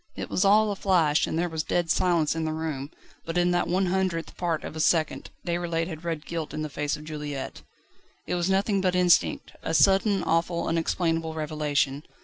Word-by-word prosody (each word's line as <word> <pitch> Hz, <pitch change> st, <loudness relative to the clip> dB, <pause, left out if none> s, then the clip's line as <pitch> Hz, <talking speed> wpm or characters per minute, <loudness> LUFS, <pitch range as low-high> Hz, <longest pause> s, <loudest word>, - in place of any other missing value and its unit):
It -, -, -6 dB
was 185 Hz, -, +2 dB
all 210 Hz, +2 st, +5 dB
a -, -, -2 dB
flash, 170 Hz, -6 st, +2 dB
and -, -, -2 dB
there 175 Hz, +1 st, +1 dB
was 160 Hz, -2 st, -2 dB
dead 170 Hz, +1 st, 0 dB
silence 165 Hz, -3 st, +2 dB
in 165 Hz, -, -2 dB
the 155 Hz, 0 st, -1 dB
room, 155 Hz, -3 st, -4 dB, 0.3 s
but 165 Hz, +1 st, -4 dB
in 175 Hz, 0 st, +3 dB
that 175 Hz, 0 st, +1 dB
one 185 Hz, +2 st, +1 dB
hundredth 180 Hz, -2 st, -1 dB
part 170 Hz, -3 st, -1 dB
of -, -, -7 dB
a -, -, -5 dB
second, 160 Hz, 0 st, +1 dB, 0.2 s
Déroulède 170 Hz, -1 st, -1 dB
had 160 Hz, -2 st, -7 dB
read 165 Hz, -3 st, -3 dB
guilt 165 Hz, -3 st, -4 dB
in 155 Hz, -, -3 dB
the 155 Hz, -, -4 dB
face 145 Hz, +1 st, -2 dB
of 150 Hz, -, -11 dB
Juliette. 150 Hz, -3 st, -6 dB, 0.6 s
It -, -, -3 dB
was 175 Hz, +1 st, 0 dB
nothing 195 Hz, +1 st, +2 dB
but 185 Hz, -1 st, +1 dB
instinct, 180 Hz, -2 st, +3 dB
a 160 Hz, -, -2 dB
sudden, 195 Hz, +2 st, +4 dB
awful, 170 Hz, +1 st, 0 dB
unexplainable 165 Hz, -1 st, 0 dB
revelation. 150 Hz, -3 st, -1 dB
165 Hz, 200 wpm, -26 LUFS, 155-180 Hz, 0.6 s, all